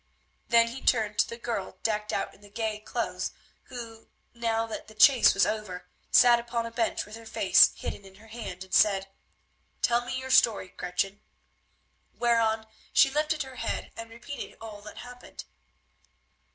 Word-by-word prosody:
Then 230 -1 +4
he 255 +3 -8
turned 215 -3 +1
to - - +3
the 235 - -7
girl 230 -5 -4
decked 210 -1 -1
out - - -2
in - - -21
the 205 - -15
gay 215 0 -3
clothes, 215 - -3 0.3
who, 230 -3 -9 0.3
now 230 -1 -1
that 225 - -7
the 215 - -15
chase 255 +2 +6
was 195 - +4
over, 190 -5 -4 0.2
sat 240 -1 +6
upon 235 0 -3
a 230 - -6
bench 230 -1 -1
with 210 - -10
her 230 - -13
face - - +5
hidden - - -6
in 190 -1 -15
her 220 +3 -17
hand, 215 -5 -7
and 190 - -15
said, 195 -2 +3 0.7
"Tell 240 0 +3
me 245 - -4
your 260 0 -5
story, 225 -7 +4
Gretchen," 195 +3 -3 0.9
whereon 225 -2 +1 0.3
she 270 - +5
lifted 300 +1 0
her 265 -1 -12
head - - -4
and 230 0 -8
repeated 235 +5 -8
all 215 -2 -9
that 210 - -11
happened. 245 0 -10
225 Hz, 170 wpm, -28 LUFS, 210-240 Hz, 0.9 s, chase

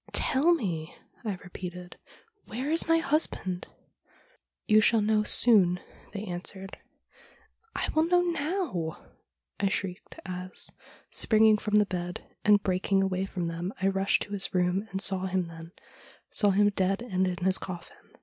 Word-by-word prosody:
"Tell 310 +6 +3
me," 170 - -4 0.3
I 210 -4 -2
repeated, 180 0 -8 0.5
"where 255 +7 -4
is 330 +1 +4
my 330 0 +4
husband?" 275 - -1 0.3
' - - -33
" - - -60
You 215 0 +6
shall 225 +1 +4
know 215 0 +2
soon," 200 -5 +5 0.3
they 205 -1 -5
answered. 190 +2 -7 0.3
' - - -27
" 455 0 -39
I - - -1
will 315 +1 +3
know 355 +1 +3
now," 325 - -2 0.5
I 200 - +2
shrieked, 195 0 -4
as, 185 0 -4 0.4
springing 220 -1 +4
from 210 0 -1
the 210 0 +5
bed 180 -2 -5 0.2
and 205 -1 +5
breaking 195 +1 +1
away 190 0 -1
from 180 -2 -4
them, 170 +4 -4
I 190 +1 +2
rushed 195 0 +1
to 205 - -9
his 195 -1 -3
room, 180 +3 +1
and 190 - -3
saw 190 -1 0
him 185 -1 -1
then 165 0 -11 0.3
— - - -25
saw 205 - +3
him 205 +1 +4
dead 195 +2 0
and 190 -5 0
in 180 -1 -2
his 190 0 +2
coffin. 175 -2 -8
195 Hz, 170 wpm, -28 LUFS, 180-220 Hz, 0.5 s, You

